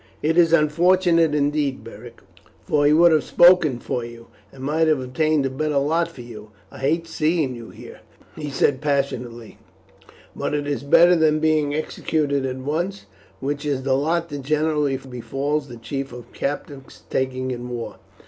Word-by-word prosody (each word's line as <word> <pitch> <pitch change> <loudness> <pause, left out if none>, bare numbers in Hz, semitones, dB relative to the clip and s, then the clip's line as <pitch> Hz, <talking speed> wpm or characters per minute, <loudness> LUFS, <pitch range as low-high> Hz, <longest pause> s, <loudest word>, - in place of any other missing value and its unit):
"It 160 +2 +1
is 170 -2 +4
unfortunate 170 0 +3
indeed, 145 -1 0
Beric, 115 +1 -12 0.4
for 145 -1 +2
he - - +4
would 170 +2 +6
have 155 -2 +4
spoken 175 -7 +5
for 120 0 -4
you, 115 0 -11 0.2
and 130 - -12
might 155 +3 +1
have 155 -3 +2
obtained 140 +3 0
a - - 0
better 150 +2 -1
lot 160 +5 +1
for 150 -7 -12
you. 115 -3 -11 0.2
I - - -12
hate 160 +5 0
seeing 160 -3 0
you 115 -1 -10
here," - - -12 0.4
he 150 -2 -5
said 135 0 +1
passionately, 130 -6 -3 0.8
"but - - -2
it 145 -1 -2
is 145 -1 -2
better 170 +5 +5
than 155 -2 +3
being 155 -2 +1
executed 145 -3 -1
at 130 0 -4
once, 170 +9 -3 0.4
which 145 +2 -3
is 140 -3 -2
the 135 0 +1
lot 165 +5 0
that 145 -1 -6
generally 150 -1 0
befalls 135 +3 -3
the 120 -2 -10
chief 135 +4 -5
of 120 -1 -11
captives 140 -1 -6
taken 130 0 -1
in 125 0 -6
war. 120 -1 -6
145 Hz, 170 wpm, -22 LUFS, 130-155 Hz, 0.8 s, would